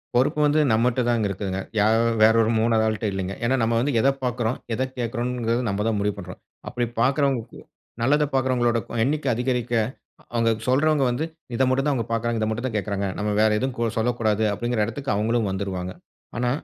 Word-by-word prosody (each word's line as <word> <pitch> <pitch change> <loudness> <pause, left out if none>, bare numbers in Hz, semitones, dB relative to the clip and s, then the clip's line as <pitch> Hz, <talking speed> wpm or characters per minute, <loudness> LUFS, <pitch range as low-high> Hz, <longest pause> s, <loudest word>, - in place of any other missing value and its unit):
பொறுப்பு 135 +5 +2
வந்து 150 +1 +3
நம்மட்டதாங்க 120 0 +2
இருக்குதுங்க. 95 -1 -3 0.2
யாரோ 110 +2 +4 0.2
வேற 110 +1 +7
ஒரு 110 - +2
3வது 110 -1 +2
ஆள்ட்ட 110 0 -2
இல்லேங்க. 95 0 -3
ஏன்னா, 125 +3 +2
நம்ம 115 +1 +1
வந்து 140 +4 0
எத 135 - +4
பார்க்கிறோம், 120 -1 -1 0.2
எத 130 - 0
கேட்கிறோங்கிறது 120 0 -1
நம்ம 100 +1 -1
தான் 110 -2 +1
முடிவு 100 0 0
பண்றோம். 90 -2 -9 0.3
அப்படி 120 - -1 0.2
பார்க்கிறவங்களுக்கு 135 -2 0 0.4
நல்லத 145 +5 +3
பார்க்கிறவங்களோட 125 -3 +2 0.3
எண்ணிக்கை 145 +2 0
அதிகரிக்க, 125 0 -1 0.6
அவுங்க 115 -1 +2 0.2
சொல்றவுங்க 145 +3 +3
வந்து 125 +6 -1 0.3
இத 130 - +2
மட்டும் 135 +2 +1
தான் 145 - +2
அவுங்க 120 -4 -2
பார்க்குறாங்க, 115 0 0
இத 110 - +1
மட்டும் 120 +4 -2
தான் 110 -4 -2
கேட்குறாங்க. 100 -1 -2
நம்ம 105 0 -1
வேற 110 - +5
எதுவும் 130 +1 -2
கொ 115 -1 +1
சொல்லக்கூடாது 110 -2 +1
அப்பிடிங்கிற 115 +1 0
இடத்துக்கு 135 +2 -3
அவுங்களும் 110 0 +1
வந்துருவாங்க. 95 -2 -4 0.4
ஆனா 125 +1 0
115 Hz, 175 wpm, -24 LUFS, 110-125 Hz, 0.6 s, வேற